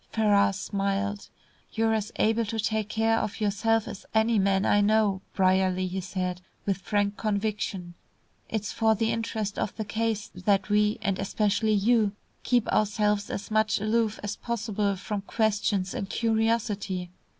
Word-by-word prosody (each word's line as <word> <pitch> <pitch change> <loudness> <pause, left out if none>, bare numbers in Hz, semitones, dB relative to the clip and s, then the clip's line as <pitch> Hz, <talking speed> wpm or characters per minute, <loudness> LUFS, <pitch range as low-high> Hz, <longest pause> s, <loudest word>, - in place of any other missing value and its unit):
Ferrars 205 -2 +3
smiled. 200 +1 -2 0.4
"You're 225 0 +2
as 215 0 -1
able 225 +2 +2
to 225 +2 -3
take 215 -1 -1
care 225 +1 +2
of 215 - -4
yourself 220 +1 +1
as 210 -4 -7
any 220 0 +3
man 195 0 +2
I 205 - +4
know, 205 -2 +2
Brierly," 185 -1 +2
he 185 +1 -3
said, 180 0 -3 0.2
with 195 -3 0
frank 205 +1 0
conviction. 200 -4 -2 0.6
"It's 215 -2 -2
for 220 -1 +2
the 225 +1 0
interest 220 -2 -3
of 195 - -2
the 220 - -4
case 220 0 -2
that 195 +2 +1
we 210 0 +3
and 195 -3 0
especially 210 +2 +1
you 210 0 +3 0.3
keep 245 -3 +1
ourselves 210 -1 +1
as 200 - -5
much 215 0 +2
aloof 215 +1 0
as 205 0 -3
possible 215 -3 -1
from 200 +2 -4
questions 205 -3 0
and 195 - -4
curiosity. 220 -5 0
210 Hz, 150 wpm, -27 LUFS, 195-220 Hz, 0.6 s, I